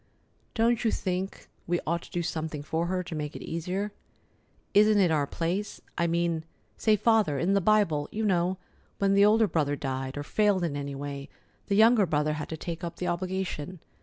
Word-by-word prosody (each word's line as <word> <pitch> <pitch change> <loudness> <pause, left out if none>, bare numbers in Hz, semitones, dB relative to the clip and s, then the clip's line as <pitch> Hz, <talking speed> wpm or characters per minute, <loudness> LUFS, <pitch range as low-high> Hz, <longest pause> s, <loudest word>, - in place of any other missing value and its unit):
Don't 230 +1 +2
you 225 - +3
think 190 -1 -3 0.2
we 175 0 +1
ought 170 +1 0
to - - -13
do 175 - -2
something 160 -3 -3
for 160 +3 -1
her, 185 0 -1
to 175 - -7
make 150 -1 -4
it - - -7
easier? 180 +5 -3 0.8
Isn't 210 +1 +6
it 185 -5 +4
our 145 -3 +1
place? 175 +8 -2 0.2
I 170 - +1
mean—say, 170 +5 -1
Father, 210 -8 +3
in 175 +7 +1
the 200 - +3
Bible, 175 -8 +2
you 220 +1 -2
know, 185 -1 +1 0.4
when 195 0 +2
the 200 +1 +6
older 220 +1 +5
brother 145 -5 0
died, 135 -1 -4
or 145 - -3
failed 205 +2 +2
in 160 -4 -1
any 140 -1 -4
way, 140 0 -6 0.4
the 200 - +1
younger 220 -1 +6
brother 150 0 +1
had 150 0 -5
to 160 - -4
take 170 +2 -6
up 170 - -4
the 180 - -4
obligation. 185 -2 -3
175 Hz, 195 wpm, -28 LUFS, 155-200 Hz, 0.8 s, Isn't